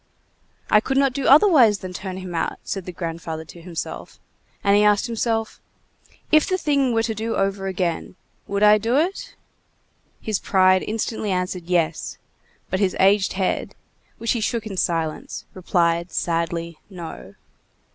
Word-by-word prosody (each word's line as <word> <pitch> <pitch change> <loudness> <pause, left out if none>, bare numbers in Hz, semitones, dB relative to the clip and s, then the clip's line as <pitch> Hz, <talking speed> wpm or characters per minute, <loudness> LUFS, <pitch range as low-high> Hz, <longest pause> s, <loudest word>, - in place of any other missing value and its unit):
"I 210 - +7
could 265 +5 -2
not 275 -2 +3
do 270 0 -2
otherwise 275 - +6
than 185 -1 -8
turn 185 0 -6
him 185 -2 -7
out," 165 - -2
said 195 -3 -4
the 180 - -5
grandfather 165 -2 -5
to 170 +1 -13
himself, 170 -1 -7 0.4
and 200 0 +4
he 205 - +5
asked 210 -1 +4
himself: 225 -1 -2 0.7
"If 310 -1 +5
the 370 - +1
thing 280 -6 +1
were 225 -1 +1
to 225 -1 -1
do 220 +2 -3
over 195 0 -1
again, 180 -2 -2 0.3
would 200 +1 -1
I 210 0 +7
do 230 +4 0
it?" 350 +6 -1 0.8
His 215 -3 -2
pride 185 -1 +4
instantly 220 0 -2
answered 180 -1 -2
"yes," 170 -3 -1 0.5
but 185 - 0
his 195 -2 +1
aged 195 +1 +4
head, 185 -1 -2 0.4
which 230 - -1
he 235 - 0
shook 225 +1 -1
in 205 -3 -5
silence, 165 -3 -2
replied 170 -1 0
sadly 170 -1 -2
"no." 170 - -9
195 Hz, 155 wpm, -22 LUFS, 175-225 Hz, 0.8 s, I